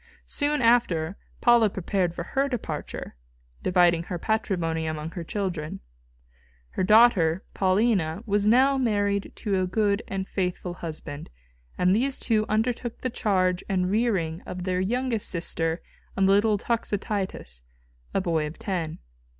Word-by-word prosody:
Soon 290 -2 0
after 195 -8 +3 0.3
Paula 235 -3 +5
prepared 185 -2 -1
for 170 - -4
her 275 +9 0
departure, 245 - -5 0.5
dividing 175 -2 +3
her 175 - -4
patrimony 175 -6 -1
among 155 0 -4
her 170 0 -6
children. 175 -4 -3 0.9
Her - - -3
daughter, 195 -5 +5
Paulina, 190 -2 +1
was 205 -1 +1
now 265 +4 +5
married 205 -4 0
to 200 -3 -1
a 185 - 0
good 205 +2 +1
and 190 -1 -3
faithful 180 -1 -2
husband, 155 -4 -7 0.5
and 180 +2 +3
these 265 +4 +1
two 215 -2 +1
undertook 230 +2 -1
the 255 - -2
charge 185 -6 +1
and 185 -1 +1
rearing 195 -7 0
of 180 0 -7
their 185 0 0
youngest 235 +3 0
sister 165 -1 0 0.3
and 195 0 +4
the - - +5
little 205 +1 +4
Toxotius, 200 - -3 0.5
a 195 - 0
boy 165 -4 0
of 150 - -9
ten. 175 -7 -3
195 Hz, 140 wpm, -26 LUFS, 175-220 Hz, 0.9 s, Paula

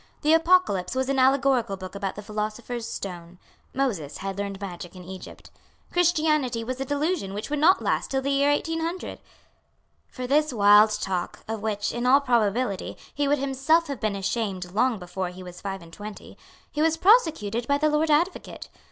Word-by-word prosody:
The 305 +2 +4
Apocalypse 325 - +3
was 260 0 0
an 275 -1 +1
allegorical 260 -5 +3
book 185 -1 -8
about 200 -1 -4
the 210 - -8
philosopher's 215 +3 -4
stone. 175 -2 -7 0.3
Moses 210 - -2
had 195 0 -4
learned 200 -1 -4
magic 180 -2 -7
in 180 - -10
Egypt. 185 +1 -10 0.4
Christianity 305 -9 +2
was 255 +3 -4
a - - -1
delusion 290 - -1
which 215 +7 -5
would 300 - 0
not 350 +6 +4
last - - 0
till 270 -1 0
the 280 - 0
year 280 +1 +3
1800. 325 +4 -2 0.9
For 255 - -7
this 300 +3 +2
wild 210 -1 +6
talk, 180 -2 -3
of 220 -1 -4
which, 210 -1 -1
in 240 +1 -2
all 270 +2 +7
probability, 235 -5 0 0.2
he 290 0 0
would 290 +1 +3
himself 275 +5 +2
have 275 -5 -4
been 215 -1 -1
ashamed 195 -2 -3
long 230 +4 +2
before 180 0 -4
he 185 +1 -10
was 180 -1 -10
five 195 -2 -5
and 165 0 -15
twenty, 210 +2 -9 0.4
he 300 - -2
was 325 0 +2
prosecuted 315 - +3
by 280 - +3
the 305 +1 +2
Lord 305 +1 +1
Advocate. 335 +5 0
240 Hz, 180 wpm, -25 LUFS, 200-290 Hz, 0.9 s, all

